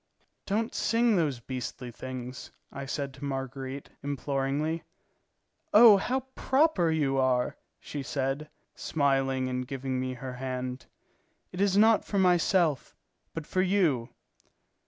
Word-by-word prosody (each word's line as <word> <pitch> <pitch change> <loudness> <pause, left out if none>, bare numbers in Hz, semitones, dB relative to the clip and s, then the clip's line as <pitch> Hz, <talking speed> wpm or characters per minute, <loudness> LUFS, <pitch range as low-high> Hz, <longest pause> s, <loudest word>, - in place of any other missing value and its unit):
"Don't 220 +3 0
sing 230 0 +2
those 150 -8 +1
beastly 125 0 -6
things," 130 +1 -7 0.2
I 135 0 -6
said 140 -1 -3
to 135 +2 -12
Marguerite, 135 0 -5
imploringly. 140 +3 -1 0.9
"Oh, 215 -2 +10
how 255 +7 -1
proper 265 - +2
you 145 -4 +1
are!" 125 -1 +1 0.2
she 145 - -6
said, 135 +2 -2 0.2
smiling 135 -3 0
and 125 0 -3
giving 130 -1 -3
me 130 0 -3
her 130 +1 -6
hand. 130 0 -5 0.6
"It 180 - -4
is 200 -1 +3
not 220 0 +5
for 200 - -3
myself, 175 -5 +2 0.4
but 165 -2 -4
for 185 - 0
you." 175 -11 +2
140 Hz, 125 wpm, -29 LUFS, 130-180 Hz, 0.9 s, Oh